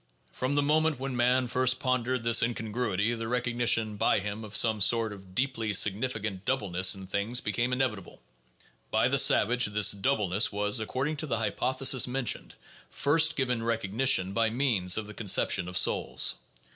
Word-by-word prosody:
From 130 +3 -3
the 145 - +2
moment 155 -1 +1
when 135 -1 -5
man 125 +1 +2
first 130 +1 +1
pon 130 -2 0
dered 125 0 -3
this 115 0 +4
incongruity, 115 -2 -2
the 115 -1 -5
recognition 120 -3 0
by - - +2
him 105 +2 -6
of 105 -1 -8
some 110 -1 +3
sort 115 +1 +2
of 95 -2 -15
deeply 115 -4 -1
significant 105 -1 0
doubleness 95 -8 +1
in 95 -1 -10
things 100 +6 -1
became 120 +1 -2
inevitable. 125 -8 -3 0.7
By - - +1
the - - +2
savage 125 +2 +3
that 105 -1 +2
doubleness 105 -7 +1
was 105 +2 0
(according 130 +7 -3
to 155 - -4
the 115 - -1
hypothesis 130 +3 +1
mentioned) 125 -1 -3 0.3
first 160 +3 +2
given 125 -3 -1
recognition 110 -3 0
by 115 +1 +1
means 110 -7 +1
of 110 - -3
the 105 - -10
conception 95 -3 0
of 90 0 -4
souls. - - +2
115 Hz, 165 wpm, -28 LUFS, 105-130 Hz, 0.7 s, this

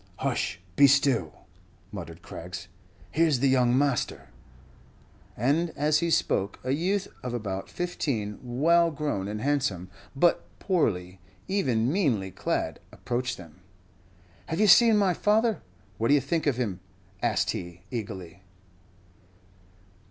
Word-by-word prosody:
"Hush 90 0 -2 0.2
be 140 - +7
still!" 135 - +1 0.5
muttered - - -8
Craggs, 90 +1 -8 0.4
"here's 160 -3 +3
the 135 +2 +2
young 125 -1 +3
master." 140 - 0 1.1
And 145 +9 +1
as 150 +1 +3
he 170 - 0
spoke, 100 -10 +1
a 130 - -1
youth 185 +7 0
of 125 -1 -4
about 95 -4 -4
fifteen, 120 - -3
well 160 +8 +3
grown 145 -11 -2
and 105 +1 -4
handsome, 110 -11 -1 0.2
but 170 +5 +3
poorly, 95 - -1 0.3
even 130 - +1
meanly 120 - +1
clad, - - -2
approached 125 +1 -3
them. 85 -1 -14 0.9
"Have 160 - -3
you 215 - +5
seen 225 +2 +7
my 195 -3 +3
father? 220 +5 +2 0.4
What 115 - +1
do 145 - +5
you - - +4
think 165 0 -1
of 135 -4 +2
him?" 105 -8 -2 0.4
asked - - +1
he, 85 0 -7
eagerly. 95 -6 -6
130 Hz, 130 wpm, -27 LUFS, 100-165 Hz, 1.1 s, be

